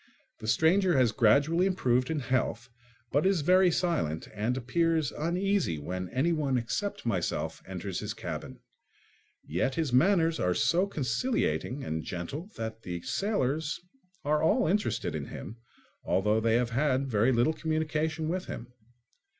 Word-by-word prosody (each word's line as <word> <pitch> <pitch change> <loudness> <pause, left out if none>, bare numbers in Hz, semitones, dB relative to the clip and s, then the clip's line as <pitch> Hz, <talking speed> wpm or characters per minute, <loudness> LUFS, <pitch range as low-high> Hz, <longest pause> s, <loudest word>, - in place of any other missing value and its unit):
The 110 - -7
stranger 175 - +3
has 125 -4 +4
gradually 140 - +3
improved 130 -9 +1
in 160 -3 -1
health 125 -1 -1 0.4
but 145 +3 +2
is 190 -4 +2
very 185 +4 +5
silent 160 - -1
and 110 +4 -1
appears 160 +3 +1
uneasy 180 - 0
when 90 +5 -4
anyone 140 -1 +1
except 120 - -3
myself 95 -7 -2
enters - - -4
his - - -4
cabin. - - -6 0.9
Yet 90 - -1
his 155 -6 -1
manners 165 +3 +3
are 90 0 +1
so 180 +4 +2
conciliating 135 - -1
and 80 0 -3
gentle 135 - -5
that 110 0 -5
the 90 -4 -5
sailors 155 - -1 0.5
are 150 +1 +2
all 160 - +3
interested 200 +6 0
in - - -3
him, 110 +7 -8 0.5
although 105 +3 +2
they 115 0 +2
have 120 0 +1
had 135 +1 +1
very 115 +1 +2
little 120 +6 +3
communication 155 0 -1
with 180 +3 -2
him. 120 +1 -8
140 Hz, 140 wpm, -29 LUFS, 115-165 Hz, 0.9 s, very